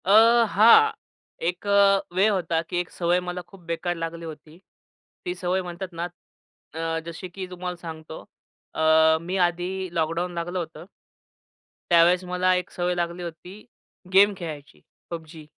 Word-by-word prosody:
अ, 225 +4 +6
हां. 230 - +7 0.6
एक 180 +3 -3
अ, 200 -1 +5
वेळ 195 +4 +4
होता, 170 -4 0
की 175 - -2
एक 175 - -3
सवय 175 0 +1
मला 180 0 -5
खूप 195 -2 -16
बेकार 175 +1 -2
लागली 165 0 -5
होती. 155 0 -11 0.7
ती 180 - -2
सवय 180 +1 -1
म्हणतात 180 +1 -7
ना 175 - -1 0.8
अ, 165 0 -1
जशी 170 +2 -7
की 185 +2 -6
तुम्हाला 180 0 -5
सांगतो. 160 -1 -8 0.5
अ, 160 0 +4
मी 180 +3 -3
आधी 180 +2 -4
लॉकडाऊन 165 +2 -1
लागलं 175 +2 -3
होतं 165 0 -7 1.1
त्यावेळेस 175 +2 +5
मला 180 0 +1
एक 180 -1 -2
सवय 180 0 -1
लागली 175 0 -3
होती, 170 +2 -9 0.6
गेम 200 +2 +6
खेळायची. 155 -5 -8 0.3
PUBG. 160 -1 -8
175 Hz, 145 wpm, -25 LUFS, 165-185 Hz, 1.1 s, हां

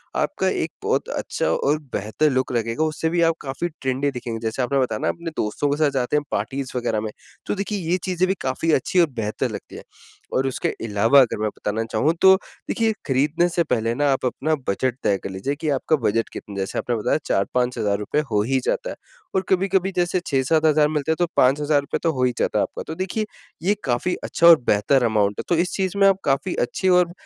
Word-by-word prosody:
आपका - - 0
एक - - -2
बहुत - - 0
अच्छा - - -3
और 150 +2 +1
बेहतर 110 +9 0
लुक 130 0 0
लगेगा 115 +5 0
उससे 155 +1 -1
भी 170 0 +1
आप 165 - -1
काफ़ी 135 +5 -3
ट्रेंडी 135 +2 0
दिखेंगे। 120 -3 -5
जैसे 120 +4 -2
आपने 135 +3 +1
बताया 115 -5 0
न - - +1
अपने 170 -1 -7
दोस्तों 110 +7 -1
के 145 - 0
साथ 155 -1 +3
जाते 135 +1 0
हैं 150 - 0
पार्टीज़ 135 -1 -3
वग़ैरह 115 -3 -1
में। 110 -1 -4 0.4
तो - - 0
देखिए 200 +1 -3
ये 180 - +3
चीज़ें 185 0 +1
भी 190 - +3
काफ़ी 135 +5 0
अच्छी 180 +7 +2
और 170 - +5
बेहतर 110 -2 -2
लगती - - -8
हैं। - - -9 0.5
और 135 +1 +1
उसके 130 - -1 0.2
अलावा 115 +7 +4
अगर 115 -4 0
मैं 110 - +1
बताना 110 +2 -2
चाहूँ 160 - +2
तो 190 0 +8 0.3
देखिए 225 -1 +1
खरीदने 145 +6 +2
से 170 0 +1
पहले 115 -5 0
न 145 - -3
आप 140 -3 +2
अपना 155 +5 0
बजट 125 +5 0
तय 100 - +2
कर - - -4
लीजिए 95 +10 -3
कि, 155 0 -3
आपका 145 +3 +1
बजट 115 -4 0
कितना 105 - -8
है? 100 - -7
जैसे 95 - -2
आपने 120 - -1
बताया 110 - +1
4-5 125 +5 0
हज़ार 100 -1 +1
रुपए 105 +8 -1
हो 105 - +3
ही 130 +3 +1
जाता - - -1
है - - -6 0.4
और 190 - +3
कभी-कभी 190 0 +2
जैसे 175 +1 +1
6-7 145 +3 +2
हज़ार 150 -1 +4
मिलते 150 0 -1
हैं - - +2
तो 175 - +3
₹5,000 145 +2 +2
तो 165 - +3
हो 130 -2 -1
ही 125 - +3
जाता - - +1
है - - +3
आपका। - - -5
तो 160 - -5
देखिए 190 +4 -2 0.4
ये 200 +4 +3
काफ़ी 130 +8 0
अच्छा 170 - +3
और 165 -2 +10
बेहतर 115 +6 +3
अमाउंट 105 -3 +1
है - - -2
तो 175 - +3
इस 180 - -2
चीज 190 -1 -1
में 195 0 +6
आप 195 - +4
काफ़ी 140 +7 +1
अच्छी 190 +9 -1
और 180 -1 +4
140 Hz, 230 wpm, -22 LUFS, 120-170 Hz, 0.5 s, और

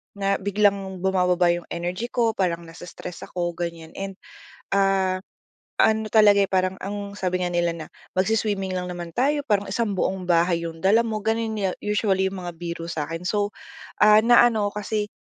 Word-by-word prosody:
na 195 0 0
biglang 200 -2 0
bumababa 180 -2 +3
'yong 175 0 -3
energy 180 +7 -3
ko, 235 -2 +1
parang 170 -4 -1
nasa-stress 175 +1 -9
ako, 175 -1 -2
ganiyan. 170 -2 -5
And, 195 0 -5 0.6
ah, 195 -1 +2 0.6
ano 220 0 +3
talaga, 210 -2 +6
eh, 195 - 0
parang 185 -1 +2
ang 200 +1 -5
sabi 185 -2 -1
nga 175 - -2
nila 175 0 +1
na, 160 -2 -7 0.3
"Magswi-swimming 200 -1 0
lang 180 0 -3
naman 175 -1 -6
tayo 290 +3 +1
parang 205 -3 +1
isang 215 0 0
buong 190 0 -1
bahay 170 -1 +2
'yong 165 -1 -6
dala 210 +6 +4
mo." 215 -1 -2
Gano'n 225 0 -1 0.3
usually 205 -2 +1
'yong 195 - -6
mga 175 - -4
biro 170 -1 -5
sa 155 -3 -2
akin. 165 +2 -6
So, 205 0 0 0.5
ah, 210 0 +7
na 240 0 +7
ano 220 -4 +2
'ko 210 - -4
kasi, 210 0 -2
190 Hz, 180 wpm, -24 LUFS, 175-210 Hz, 0.6 s, ah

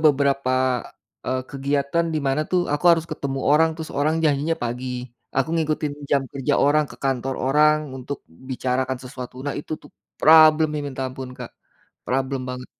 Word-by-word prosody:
beberapa, 140 -3 +3 0.7
eee, 130 0 -1
kegiatan 140 +4 0
di - - +1
mana 135 +3 +1
tuh 180 - +3
aku 145 +4 -2
harus 165 -1 +1
ketemu 135 -1 -3
orang 160 +2 +5
terus 160 -1 -6
orang 155 +2 +2
janjinya 150 +2 +1
pagi, 125 +2 -3 0.5
aku 135 +2 +2
ngikutin 155 -2 0 0.2
jam 140 -1 +3
kerja 135 -2 0
orang 150 +1 +4
ke - - -11
kantor 135 0 0
orang 150 +3 +4 0.2
untuk 135 +2 -6 0.3
bicarakan 130 0 -1
sesuatu. 125 -1 -8
Nah 145 - -1
itu 150 - -8
tuh - - -15 0.3
problem-nya 155 -1 +6
minta 135 -1 -5
ampun 130 0 -7
Kak. - - -7 0.6
Problem 130 +1 -1
banget. 125 0 -6
140 Hz, 160 wpm, -23 LUFS, 130-155 Hz, 0.7 s, problem-nya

